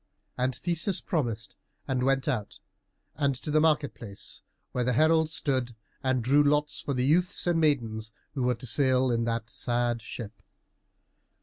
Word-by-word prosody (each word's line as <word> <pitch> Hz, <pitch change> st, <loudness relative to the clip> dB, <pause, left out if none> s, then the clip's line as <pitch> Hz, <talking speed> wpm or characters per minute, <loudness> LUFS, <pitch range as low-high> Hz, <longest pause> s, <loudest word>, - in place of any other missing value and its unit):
And 125 Hz, 0 st, 0 dB
Theseus 170 Hz, +7 st, 0 dB
promised, 115 Hz, -, -3 dB, 0.3 s
and 130 Hz, -1 st, 0 dB
went 135 Hz, 0 st, +1 dB
out, 120 Hz, -8 st, -2 dB, 0.6 s
and 140 Hz, -3 st, +1 dB
to 150 Hz, +4 st, -5 dB
the 155 Hz, +1 st, +4 dB
market 150 Hz, -3 st, +2 dB
place, 100 Hz, -5 st, -8 dB, 0.3 s
where 125 Hz, -, -1 dB
the 125 Hz, +1 st, +1 dB
herald 160 Hz, +4 st, +4 dB
stood 130 Hz, -6 st, -1 dB, 0.3 s
and 130 Hz, -3 st, 0 dB
drew 140 Hz, +5 st, +4 dB
lots 150 Hz, +1 st, +1 dB
for 140 Hz, -, -2 dB
the 125 Hz, 0 st, +1 dB
youths 175 Hz, +6 st, +3 dB
and 170 Hz, -2 st, +2 dB
maidens 115 Hz, -7 st, 0 dB, 0.2 s
who 135 Hz, -, -3 dB
were 125 Hz, 0 st, +2 dB
to 120 Hz, -, -9 dB
sail 130 Hz, +1 st, +3 dB
in 115 Hz, -1 st, +1 dB
that 115 Hz, -1 st, -2 dB
sad 120 Hz, -1 st, -1 dB
ship. 110 Hz, -1 st, -8 dB
130 Hz, 165 wpm, -28 LUFS, 120-150 Hz, 0.6 s, the